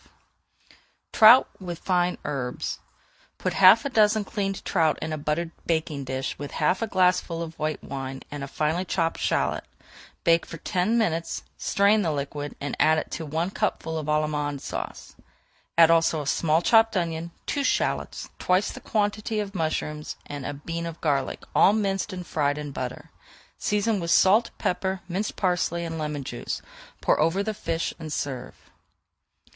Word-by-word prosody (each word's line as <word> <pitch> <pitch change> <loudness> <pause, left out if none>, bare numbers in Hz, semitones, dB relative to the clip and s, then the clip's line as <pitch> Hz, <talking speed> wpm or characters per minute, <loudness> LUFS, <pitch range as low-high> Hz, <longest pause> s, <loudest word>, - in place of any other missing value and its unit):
[Page - - -30 0.3
419] 230 +4 +7
TROUT - - -26
WITH 175 -2 -5
FINE 180 -1 +2
HERBS 135 -4 -3 0.6
Put - - -2
half - - +7
a - - 0
dozen 215 -3 +3
cleaned 195 -1 -3
trout 160 -4 +2
in 160 0 -3
a - - -2
buttered 155 +3 -1 0.2
baking 160 -4 -1
dish 130 +1 -3
with 145 0 -6
half 170 +7 +1
a 225 - 0
glassful 180 -3 +1
of 160 -1 -9
white 155 0 -2
wine, 135 -1 -6
and 145 -1 -5
a - - -4
finely 155 +5 0
chopped 165 -3 -1
shallot. - - 0 0.6
Bake 165 0 +3
for 165 - -7
ten 185 +7 0
minutes, 170 -7 -1
strain 200 +2 +3
the 165 -5 0
liquid, 145 0 -4
and 145 - -3
add 155 0 +3
to 165 - -4
it - - -9
one 165 +5 -1
cupful 160 -4 -2
of 155 - -6
Allemande 150 -2 0
Sauce. - - -6 0.6
Add 165 -1 +8
also 165 -2 +3
a - - -10
small 160 +3 +2
chopped 225 0 +5
onion, 165 -1 -2 0.2
two 285 - -1
shallots, - - -1
twice 185 +3 +2
the - - -9
quantity 215 0 -1
of 200 -1 -4
mushrooms, 155 -3 -2
and 145 -2 -6
a 145 - -3
bean 165 +4 -4
of 165 0 -7
garlic, 140 -4 -1
all 200 - +6
minced 200 -1 0
and 180 -1 -6
fried 145 -2 0
in 150 -1 -5
butter. 125 -2 -6 0.5
Season 210 0 +1
with 170 -1 -3
salt, 210 +7 +5
pepper, 190 +1 -1
minced 190 +4 -2
parsley, 175 -2 0
and 165 -1 -4
lemon 150 -2 -3
juice; 120 -2 -5 0.4
pour - - +2
over 165 +6 +2
the 220 +1 -2
fish 165 -5 -2
and 160 -2 -7
serve. 130 -4 -4
165 Hz, 170 wpm, -26 LUFS, 150-195 Hz, 0.6 s, Add